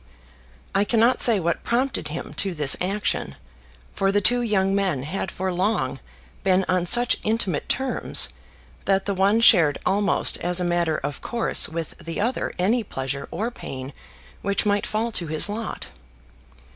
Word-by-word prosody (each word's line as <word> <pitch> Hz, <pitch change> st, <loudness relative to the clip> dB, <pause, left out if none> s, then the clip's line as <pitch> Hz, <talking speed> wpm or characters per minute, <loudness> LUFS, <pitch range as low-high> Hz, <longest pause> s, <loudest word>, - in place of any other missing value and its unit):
I 195 Hz, -, +3 dB
cannot 230 Hz, +3 st, +2 dB
say 230 Hz, -4 st, +4 dB
what 170 Hz, -1 st, -2 dB
prompted 250 Hz, +1 st, -1 dB
him 155 Hz, +3 st, -6 dB
to 195 Hz, -3 st, +1 dB
this 145 Hz, -3 st, +5 dB
action; 195 Hz, +3 st, -1 dB, 0.6 s
for 195 Hz, 0 st, +1 dB
the 205 Hz, -, +2 dB
two 245 Hz, +5 st, +3 dB
young 195 Hz, -4 st, +1 dB
men 190 Hz, -9 st, 0 dB
had 185 Hz, +5 st, -4 dB
for 185 Hz, 0 st, -3 dB
long 180 Hz, -7 st, -1 dB, 0.4 s
been 190 Hz, 0 st, +2 dB
on 180 Hz, -1 st, 0 dB
such 240 Hz, +5 st, +4 dB
intimate 210 Hz, -8 st, -1 dB
terms 265 Hz, 0 st, +1 dB, 0.6 s
that 195 Hz, -1 st, +1 dB
the 200 Hz, -, -1 dB
one 200 Hz, +4 st, +2 dB
shared 170 Hz, -10 st, +5 dB
almost 200 Hz, +2 st, +1 dB
as 175 Hz, +1 st, 0 dB
a -, -, 0 dB
matter 175 Hz, -2 st, 0 dB
of 145 Hz, +1 st, -5 dB
course 235 Hz, -1 st, +2 dB
with 165 Hz, 0 st, -5 dB
the 165 Hz, 0 st, -6 dB
other 235 Hz, +5 st, -1 dB
any 220 Hz, +6 st, +1 dB
pleasure 135 Hz, -5 st, -5 dB
or 220 Hz, +8 st, -3 dB
pain 135 Hz, -, -8 dB, 0.5 s
which 200 Hz, +1 st, -1 dB
might 205 Hz, 0 st, +1 dB
fall 225 Hz, +2 st, -1 dB
to 175 Hz, -6 st, -2 dB
his 155 Hz, +4 st, +1 dB
lot. 215 Hz, +2 st, -5 dB
195 Hz, 160 wpm, -23 LUFS, 170-215 Hz, 0.6 s, this